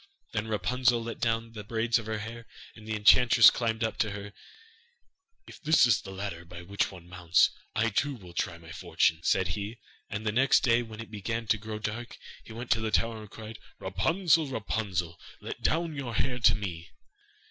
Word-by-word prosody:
Then 105 +1 -2
Rapunzel 115 +4 +1
let 115 0 -6
down 115 -1 0
the 105 -2 -8
braids 115 +2 +1
of 110 - -9
her 110 -1 -2
hair, 115 +2 -8 0.3
and 110 -1 -13
the 110 - -2
enchantress 115 +2 +7
climbed 115 -1 -1
up 110 - -2
to 110 - +2
her. 100 0 -7 1.1
'If - - -13
that 155 -3 +5
is 120 - +3
the - - -10
ladder 95 -3 -5
by 85 0 -10
which 100 +3 -1
one 90 -3 -12
mounts, 90 -2 +3 0.2
I 115 +2 +2
too 140 +7 0
will 90 -7 -13
try 85 0 -2
my 80 -1 -13
fortune,' 80 -1 +1
said 90 +1 +2
he, 100 +6 -4 0.3
and 110 0 -5
the 105 - +1
next 130 +5 +4
day 120 -2 +3
when 115 -2 -8
it 115 - -10
began 115 +2 -3
to 110 - +4
grow 110 0 -6
dark, 110 +3 -5 0.3
he - - -13
went 120 +2 -7
to 115 - +3
the 110 - -1
tower 115 0 0
and 105 - -11
cried: 110 0 -9 0.2
'Rapunzel, 160 - +2
Rapunzel, 100 -8 -3 0.2
Let - - -7
down 165 0 0
your 130 -5 -4
hair 125 -1 0
to 115 - +5
me. 85 -6 -5
110 Hz, 200 wpm, -29 LUFS, 100-115 Hz, 1.1 s, enchantress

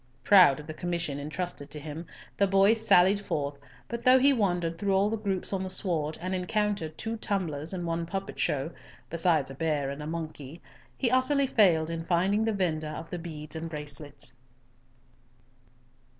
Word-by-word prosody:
Proud 180 -9 +7
of 150 - -9
the 155 - -6
commission 170 -4 -2
entrusted 150 0 -4
to 150 - -6
him, 155 +3 -7 0.3
the 200 - +3
boy 195 +2 +5
sallied 200 -3 +4
forth, 145 -7 -3 0.3
but 235 0 -5
though 255 +1 +7
he 275 +2 +5
wandered 175 -7 0
through 195 0 +1
all 200 +2 +2
the - - +1
groups 200 -3 -2
on 190 - -1
the 190 - -3
sward, 160 -5 -1
and 185 +3 -3
encountered 190 -4 -1
two 225 +1 -4
tumblers 170 -8 -2
and 180 -2 -4
one 165 0 -2
puppet 195 +2 -5
show, 145 +3 0 0.4
besides 165 -5 +2
a - - -7
bear 145 -2 -1
and 140 +2 -6
monkey, 155 -2 -6 0.4
he 245 -3 +1
utterly 275 +2 +3
failed 170 -10 +3
in 165 0 -4
finding 185 +5 +2
the 225 - +1
vendor 165 -6 -1
of 160 +1 -7
the 180 - -4
beads 155 -2 -6
and 165 +1 -4
bracelets. 150 -3 -7
170 Hz, 175 wpm, -28 LUFS, 155-200 Hz, 0.4 s, Proud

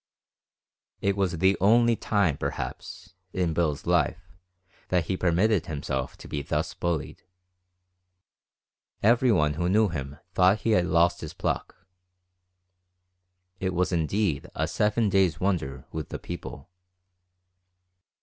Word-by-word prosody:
It 100 0 +1
was 95 -4 0
the 95 +3 +3
only 115 +3 +5
time, 100 -9 +1
perhaps, 90 +4 -6 0.2
in 90 -3 0
Bill's 80 -3 -1
life, - - 0 0.6
that 90 -3 +1
he 95 - -1
permitted 90 +2 +2
himself 65 -3 -3
to - - -11
be 75 - -3
thus - - -2
bullied. 85 -4 -3 1.8
Everyone 110 - +4
who 85 +3 -1
knew 105 +2 +3
him 70 -3 -5 0.2
thought 95 +4 +4
he 115 - +1
had 90 -4 +3
lost 85 0 +3
his 80 - -7
pluck. - - -3 1.7
It 95 -1 -2
was 90 +2 +1
indeed 85 -2 0
a - - 0
seven 105 +1 +1
days' 95 -4 +2
wonder 80 -9 -1
with 80 -2 -5
the - - -4
people. 85 -3 -8
90 Hz, 120 wpm, -26 LUFS, 80-100 Hz, 1.8 s, only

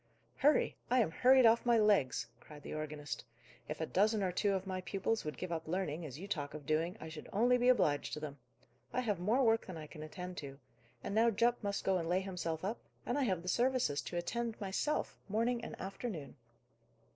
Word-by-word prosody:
"Hurry! 295 +2 +3
I 250 +1 +4
am 210 -9 +2
hurried 255 +6 +6
off 230 +1 +6
my 240 -1 +4
legs," 205 - +3
cried 150 +1 -13
the - - -6
organist. 150 -2 -4 0.5
"If 150 - -4
a 160 - 0
dozen 210 +4 +2
or 185 - +1
two 200 +3 +1
of 190 0 -1
my 185 -1 -3
pupils 200 +4 -1
would 150 -4 -5
give 185 - -5
up 160 -1 -3
learning, 170 -2 -2
as 135 -1 -8
you 190 +5 -7
talk 145 -8 -3
of 150 -2 -8
doing, 165 +6 0
I 160 - -7
should 160 -1 -9
only 240 +5 +4
be 245 +1 +4
obliged 150 -13 +2
to - - -3
them. 145 -2 -6 0.5
I 255 - 0
have 210 -7 -1
more 220 +9 +2
work 225 -1 +3
than 185 -3 -6
I 155 - -7
can 150 0 -10
attend 180 +3 -7
to. 140 -2 -7 0.5
And - - -3
now 225 +2 +5
Jupp 235 +2 +2
must 200 -1 -1
go 190 -1 +2
and 165 -1 -3
lay 180 +2 +2
himself 180 -3 -3
up, 215 +4 -2 0.3
and 245 - -1
I 285 -2 +2
have 185 -6 0
the - - -9
services 240 - +2
to 175 - -5
attend 230 +6 -2
myself, 205 +10 -1
morning 230 +3 +1
and - - -7
afternoon!" 190 - -5
190 Hz, 220 wpm, -35 LUFS, 160-225 Hz, 0.5 s, hurried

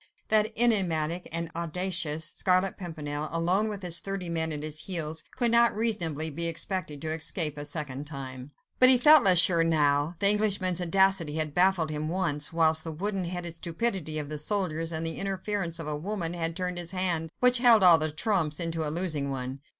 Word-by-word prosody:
That 215 0 +2
enigmatic 180 -8 +1
and 165 0 -5
audacious 170 -2 -2
Scarlet 185 +3 0
Pimpernel, 155 -4 -6
alone 175 +5 0
and - - -3
with - - -19
thirty 180 +1 -2
men 160 -1 -2
at 150 -1 -5
his 155 0 -4
heels, 160 -4 -3
could 240 -2 +1
not 235 -1 +3
reasonably 170 -9 -1
be 170 +4 -1
expected 165 -2 -2
to 155 0 -2
escape 160 -1 0
a 145 0 -7
second 145 -2 -5
time. 130 -2 -9 0.3
But 255 - +7
he 260 - +7
felt 300 +4 +6
less 185 -2 +7
sure 170 -1 +5
now: 150 0 0
the 200 - +5
Englishman's 200 -4 +3
audacity 180 -3 +1
had 155 -2 -2
baffled 180 -3 +1
him 155 +1 -4
once, 165 -5 -1
whilst 160 -1 +1
the 165 - -6
wooden 190 +3 -4
headed 175 -1 -5
stupidity 170 -1 -2
of 150 -1 -4
the 150 -1 -5
soldiers, 165 -2 -1
and 160 0 -3
the 165 -1 -3
interference 195 -3 -3
of 165 - -6
a 150 0 -4
woman 175 +1 -4
had 165 -1 -3
turned 180 -1 -4
his 170 -1 -5
hand, 175 -3 -1
which 250 0 +4
held 235 -5 +6
all 170 -3 +8
the 155 0 0
trumps, 160 -3 -1
into 165 -1 -2
a 150 - -2
losing 155 -4 -2
one. 130 0 -6
170 Hz, 195 wpm, -26 LUFS, 155-190 Hz, 0.3 s, all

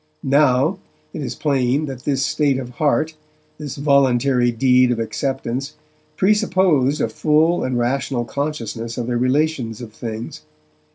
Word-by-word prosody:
Now, 140 +5 +3 0.3
it - - -5
is 135 - -4
plain 140 0 0
that 130 -3 -8
this 135 -1 +1
state 140 -3 +1
of 125 -2 -6
heart, 155 +4 0 0.5
this 145 -3 -6
voluntary 135 -3 +2
deed 125 +1 +3
of 120 - 0
acceptance, 135 +3 -3 0.4
presupposed 185 - +2
a - - +2
full 155 +3 +2
and 130 -1 -1
rational 120 0 -1
consciousness 120 -5 -4
of 120 - -2
the 120 0 -2
relations 130 -2 0
of 115 -3 -9
things. 115 0 -6
135 Hz, 135 wpm, -20 LUFS, 120-150 Hz, 0.5 s, Now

